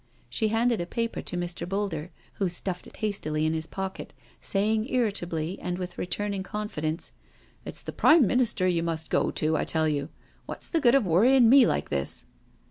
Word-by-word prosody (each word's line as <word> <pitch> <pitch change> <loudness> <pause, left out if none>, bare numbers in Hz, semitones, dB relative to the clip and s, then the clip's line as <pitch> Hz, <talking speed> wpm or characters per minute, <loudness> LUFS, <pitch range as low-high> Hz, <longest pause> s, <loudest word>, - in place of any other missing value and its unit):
She 220 - +1
handed 225 0 +1
a 175 - -4
paper 230 +4 -2
to 180 - -5
Mr. 175 0 -4
Boulder, 190 -5 -2 0.3
who 195 -3 +1
stuffed 180 +1 -4
it - - -14
hastily 155 -8 -1
into 160 +1 +1
his 160 0 -4
pocket, 190 -5 -6 0.3
saying 215 +4 +1
irritably, 185 - -1
and 180 0 -3
with 180 -1 -5
re - - -2
turning 200 +1 -2
confidence: 190 -6 -4 0.3
" - - -32
It's - - -7
the - - -6
Prime 310 -4 +6
Minister 235 -3 +1
you 175 -2 +1
must 165 -1 -3
go - - +2
to, 155 0 0
I - - +1
tell 160 -1 +1
you. 145 -1 -1 0.4
What's - - -7
the 330 - +1
good 245 -1 +5
of 270 -6 +3
worrying 230 +8 +5
me 260 -2 +7
like 75 - -1
this?" 70 -2 -3
190 Hz, 195 wpm, -27 LUFS, 165-220 Hz, 0.4 s, me